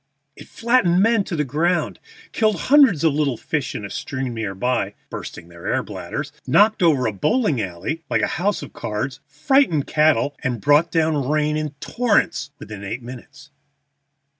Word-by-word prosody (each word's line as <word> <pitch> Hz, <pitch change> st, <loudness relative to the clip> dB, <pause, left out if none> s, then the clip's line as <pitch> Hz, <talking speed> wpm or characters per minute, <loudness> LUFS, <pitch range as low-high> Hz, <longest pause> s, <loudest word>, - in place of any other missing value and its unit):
It -, -, -13 dB
flattened 230 Hz, -7 st, +2 dB
men 225 Hz, -2 st, +3 dB
to 175 Hz, -, -4 dB
the 150 Hz, -, 0 dB
ground, 165 Hz, +6 st, 0 dB, 0.3 s
killed 215 Hz, -6 st, +1 dB
hundreds 270 Hz, -, +5 dB
of 160 Hz, -3 st, +3 dB
little 140 Hz, -5 st, 0 dB
fish 140 Hz, -2 st, -3 dB
in 105 Hz, -, -5 dB
a -, -, -7 dB
stream 130 Hz, -2 st, -4 dB
near 110 Hz, -4 st, -4 dB
by 105 Hz, -2 st, -1 dB, 0.2 s
(bursting 85 Hz, -, -8 dB
their 85 Hz, 0 st, -10 dB
air -, -, 0 dB
bladders), -, -, -6 dB, 0.2 s
knocked 215 Hz, +1 st, +4 dB
over 150 Hz, -7 st, +3 dB
a 110 Hz, -, 0 dB
bowling 155 Hz, -, +1 dB
alley 95 Hz, -, -4 dB
like -, -, +1 dB
a -, -, -1 dB
house 205 Hz, +2 st, 0 dB
of -, -, -10 dB
cards, -, -, -4 dB
frightened 265 Hz, -, +2 dB
cattle, 150 Hz, -2 st, +2 dB
and 125 Hz, -3 st, -1 dB
brought 145 Hz, +8 st, +3 dB
down 155 Hz, -5 st, 0 dB
rain 150 Hz, 0 st, +1 dB
in 155 Hz, -2 st, -3 dB
torrents 230 Hz, -, 0 dB
within 105 Hz, -4 st, -9 dB
eight 110 Hz, +5 st, -5 dB
minutes. 140 Hz, +4 st, -11 dB
150 Hz, 170 wpm, -21 LUFS, 125-175 Hz, 0.3 s, hundreds